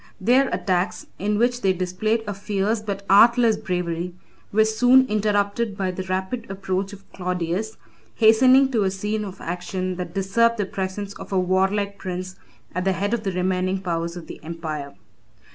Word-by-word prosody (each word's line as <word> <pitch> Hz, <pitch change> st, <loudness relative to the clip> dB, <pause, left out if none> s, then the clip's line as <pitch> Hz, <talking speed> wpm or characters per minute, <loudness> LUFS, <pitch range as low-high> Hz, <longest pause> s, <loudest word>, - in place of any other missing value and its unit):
Their 250 Hz, +7 st, +3 dB
attacks, 185 Hz, -1 st, -1 dB
in 210 Hz, +2 st, 0 dB
which 245 Hz, +2 st, +1 dB
they 190 Hz, -3 st, +3 dB
displayed 185 Hz, +5 st, -1 dB
a 205 Hz, -, -3 dB
fierce 205 Hz, +2 st, -1 dB
but 200 Hz, -2 st, -5 dB
artless 230 Hz, +3 st, +6 dB
bravery, 180 Hz, -4 st, -3 dB, 0.4 s
were 220 Hz, +1 st, +4 dB
soon 245 Hz, +4 st, +5 dB
interrupted 210 Hz, -1 st, 0 dB
by 190 Hz, -2 st, -1 dB
the 185 Hz, -, -5 dB
rapid 190 Hz, +5 st, -3 dB
approach 195 Hz, 0 st, -2 dB
of 200 Hz, -1 st, -13 dB
Claudius, 180 Hz, +3 st, -2 dB, 0.4 s
hastening 255 Hz, +4 st, +6 dB
to 230 Hz, -4 st, +1 dB
a 195 Hz, -, +2 dB
scene 210 Hz, +3 st, -2 dB
of 195 Hz, -2 st, -8 dB
action 180 Hz, +1 st, -4 dB
that 180 Hz, -1 st, -6 dB
deserved 230 Hz, +5 st, +2 dB
the 205 Hz, -, 0 dB
presence 195 Hz, +1 st, -4 dB
of -, -, -10 dB
a 195 Hz, -, +1 dB
warlike 195 Hz, +2 st, +1 dB
prince 185 Hz, 0 st, -5 dB, 0.4 s
at 180 Hz, -, -2 dB
the 190 Hz, 0 st, +2 dB
head 200 Hz, +4 st, -1 dB
of 235 Hz, -, 0 dB
the 200 Hz, -3 st, -2 dB
remaining 185 Hz, +1 st, 0 dB
powers 170 Hz, -2 st, -3 dB
of 170 Hz, -, -8 dB
the -, -, -11 dB
empire. 155 Hz, -3 st, -5 dB
195 Hz, 170 wpm, -23 LUFS, 185-215 Hz, 0.4 s, artless